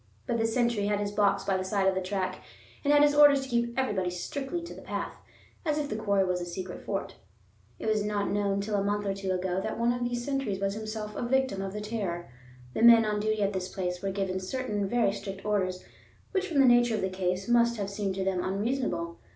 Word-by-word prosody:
But 235 - -1
the 225 - +2
sentry 235 -3 +1
had 205 0 +1
his 205 0 -2
box 205 -1 +2
by 195 -1 +1
the 185 - -2
side 190 0 +1
of 190 - +4
the 190 - -1
track 185 0 -2 0.4
and 285 - +3
had 290 0 +6
his 290 0 +5
orders 290 -2 +7
to 265 - -8
keep 235 0 0
everybody 205 -9 0
strictly 280 - -4
to 340 - -8
the - - -11
path, - - -4 0.5
as 305 -3 0
if 295 -1 -2
the - - -2
quarry 200 -3 +2
were 180 -1 0
a - - -1
secret 180 +1 -6
fort. 195 -1 -4 0.6
It - - -7
was 215 -1 +2
not 205 -1 -1
known 200 -1 +1
till 210 +1 -4
a 200 -1 +2
month 205 +1 -1
or 195 - 0
two 195 -1 -5
ago 185 0 -1
that 220 - -3
one 235 +1 +2
of 245 0 -3
these 240 0 -2
sentries 270 -9 -1
was 195 0 0
himself 215 0 -5
a - - -3
victim 260 -4 +1
of 195 0 -3
the 210 - -4
terror. 200 - -4 0.4
The - - -2
men 230 -1 +8
on 210 -1 0
duty 215 0 0
at 200 +1 0
this 185 -1 -2
place 180 -1 -3
were 195 - -1
given 190 -1 -2
certain 205 0 -2
very 240 -3 +3
strict 195 -1 -7
orders, 185 -3 0 0.5
which 385 -1 0
from 325 - -2
the - - +6
nature 240 -2 +5
of 215 - -2
the 190 - 0
case, 185 0 -2
must 235 0 +3
have 200 -1 -3
seemed 200 -2 -2
to 190 - -1
them 190 -2 0
unreasonable. 195 -4 -2
205 Hz, 245 wpm, -29 LUFS, 190-235 Hz, 0.6 s, men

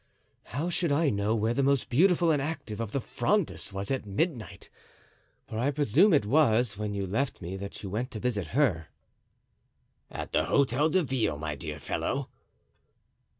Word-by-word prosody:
"How 160 +7 -3
should 170 -2 0
I 145 +1 +3
know 100 +2 0
where 110 +1 +1
the 140 - +1
most 140 -1 +2
beautiful 170 +4 +4
and 145 -3 +1
active 135 -8 -4
of 110 -3 -4
the 140 - 0
Frondists 200 - -1
was 95 +3 -4
at 135 - -1
midnight? 110 - -3 0.8
for 110 - -5
I 130 +4 +2
presume 150 - +4
it 145 - +3
was 120 -4 +3
when 105 0 -3
you 100 -1 -2
left 125 +9 -2
me 90 +1 -6
that 100 +2 -8
you 100 - -4
went 120 +5 -2
to 115 - -6
visit 105 -7 -1
her." 95 - +2 1.2
"At - - -6
the - - +2
Hotel 140 +2 +2
de 180 +3 +2
Ville, 125 - -1
my 75 0 -3
dear 75 +1 -6
fellow." - - -2
120 Hz, 175 wpm, -28 LUFS, 100-145 Hz, 1.2 s, beautiful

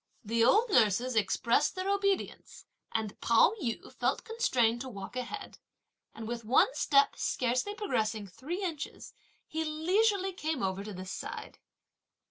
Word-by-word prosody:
The 230 +1 +1
old 425 - +4
nurses 235 - +3
expressed 230 - +2
their 370 +1 -3
obedience, 395 -1 -1 0.3
and 220 -2 -3
Pao 235 - +5
yü 235 -5 -4
felt - - -1
constrained 255 - +1
to 260 - -5
walk 200 0 -8
ahead; 255 - -6 0.6
and 225 -1 -7
with 235 0 -4
one 275 - +4
step 280 -1 +3
scarcely 255 +12 0
progressing 220 - -1
three 305 - -5
inches, 320 -6 -5 0.3
he 320 0 -3
leisurely 380 +5 +1
came 315 - -3
over 190 +1 -1
to 210 - -7
this 185 +1 -7
side. - - -7
255 Hz, 140 wpm, -31 LUFS, -, 0.6 s, Pao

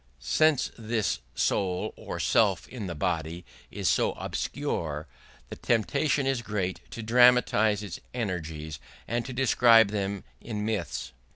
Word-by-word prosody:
Since 125 - +2
this 110 - -1 0.2
soul 90 +4 0
or - - -6
self - - +2
in 115 -6 -6
the 85 - -4
body 85 +2 -2 0.2
is - - -3
so - - +2
obscure, 75 -2 -3 0.4
the - - -6
temptation 140 +5 +1
is 135 -2 0
great 100 -5 -2
to 115 - -7
dramatise 115 -3 +4
its 105 - -6
energies 80 - -4 0.3
and 120 +1 -1
to - - -5
describe 120 -3 +5
them 100 -1 -2 0.2
in 105 -2 -4
myths. 100 - -3
105 Hz, 130 wpm, -28 LUFS, 90-120 Hz, 0.4 s, describe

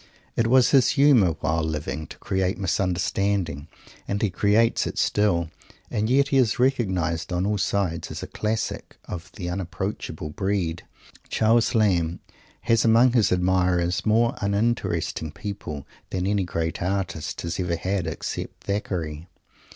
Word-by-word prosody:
It 115 - +2
was 125 0 +5
his 135 -4 +5
humour, 125 - +5
while 80 +1 +1
living, 80 0 -3
to - - -11
create 95 -1 -1
misunderstanding, 95 -4 -1 0.4
and 100 - -1
he 105 -3 0
creates 105 +5 +2
it - - -5
still. 85 -6 +1 0.4
And 110 +1 0
yet 140 +2 +3
he 135 - +2
is 125 -5 +3
recognized 95 -11 0
on 90 +1 0
all 105 0 0
sides 95 -4 -1
as - - -6
a - - -5
Classic 110 +1 -3
of 90 0 -7
the 90 -4 -6
unapproachable 90 -3 -4
breed. 90 -2 -1 0.5
Charles 115 +2 +3
Lamb 90 -6 +2 0.4
has 115 -2 +2
among 115 +2 +5
his 115 -5 +3
admirers 90 -1 +2
more 115 +2 +3
uninteresting 100 -6 -1
people 85 -6 -6 0.2
than 90 -1 -2
any 100 -1 +1
great 85 -1 -3
artist 95 -3 -2
has 85 +1 -4
ever 90 -2 0
had 95 +1 -2
except 80 - -5
Thackeray. 85 -5 -3
95 Hz, 145 wpm, -24 LUFS, 85-110 Hz, 0.5 s, was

